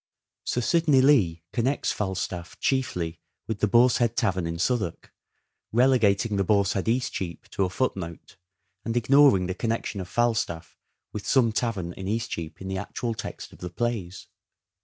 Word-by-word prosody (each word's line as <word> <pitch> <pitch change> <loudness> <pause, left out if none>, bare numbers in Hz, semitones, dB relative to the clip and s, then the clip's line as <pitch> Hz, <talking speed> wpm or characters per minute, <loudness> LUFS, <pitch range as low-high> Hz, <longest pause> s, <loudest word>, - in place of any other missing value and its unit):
Sir 125 - 0
Sidney 155 0 +3
Lee 105 - +4
connects 130 +4 0
Falstaff 95 -3 -4
chiefly 90 - -1 0.3
with 110 -2 -4
the 105 - +2
Boar's 120 +4 +5
Head 120 -1 0
Tavern 90 -3 +1
in 85 0 -4
Southwark, 100 -2 -2 0.6
relegating 115 -4 +3
the 100 - +2
Boar's 100 0 +2
Head, 95 - -2
Eastcheap, 115 -8 -2
to 95 - 0
a - - -2
footnote, 90 -6 -3 0.5
and 115 +1 -2
ignoring 130 -5 +5
the 90 - -2
connection 115 -2 -2
of 90 - -8
Falstaff 105 -7 -1 0.4
with 105 - -6
some 125 -4 +4
tavern 105 -7 -2
in 95 +1 -7
East 110 +2 -2
cheap 80 0 -5
in 95 - -7
the 95 0 -2
actual 115 +4 -3
text 110 - -7
of - - -16
the 90 - -5
plays. 100 -2 -3
105 Hz, 160 wpm, -26 LUFS, 90-120 Hz, 0.6 s, Boar's